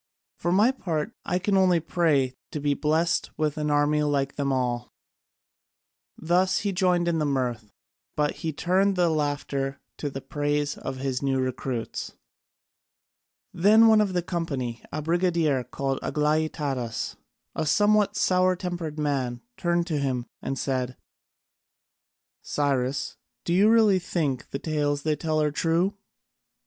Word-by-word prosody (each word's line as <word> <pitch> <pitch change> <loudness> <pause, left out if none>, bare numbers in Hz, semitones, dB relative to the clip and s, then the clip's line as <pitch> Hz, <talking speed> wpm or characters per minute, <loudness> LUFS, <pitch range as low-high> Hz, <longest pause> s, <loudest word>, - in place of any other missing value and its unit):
For 175 - 0
my 210 +7 +5
part 165 - -3
I 180 - 0
can 195 +2 0
only 185 -3 +4
pray 150 -6 +1 0.2
to 150 - -4
be 145 0 +1
blest 160 +4 +1
with 155 -1 0
an 150 0 -1
army 145 +1 +2
like 140 -2 0
them 140 -1 -1
all." 125 -2 -1 1.3
Thus 180 +3 +2
he 200 - -1
joined 180 -2 +2
in 165 -1 +1
the - - +1
mirth, 125 -6 -2 0.5
but 150 -1 0
he 160 - -3
turned 190 +6 +1
the 175 -2 +3
laughter 145 -2 -2 0.2
to 145 - -2
the 135 - -6
praise 145 +1 -1
of 135 0 -6
his 130 -1 -2
new 135 -1 +1
recruits. 130 -2 -3 1.4
Then 215 +6 +6
one 220 -1 +6
of 200 -3 0
the 175 -1 0
company, 140 -10 -3
a 155 +1 -3
brigadier 165 -5 +1
called 135 +2 -3
Aglaïtadas, 150 -5 -1 0.4
a - - -2
somewhat 205 +3 +3
sour 185 -3 +3
tempered 175 -4 -4
man, 135 -5 -1
turned 175 -1 0
to 160 -4 -1
him 130 -3 -1 0.2
and 135 0 -3
said: 130 -1 -2 1.4
"Cyrus, 140 -2 -1 0.3
do 170 - 0
you 200 +4 +5
really 220 -4 +5
think 155 -7 -2
the - - -3
tales 145 -1 -1
they 155 -1 +1
tell 155 0 -1
are 150 -1 +2
true?" 170 +6 +1
150 Hz, 145 wpm, -26 LUFS, 135-175 Hz, 1.4 s, Then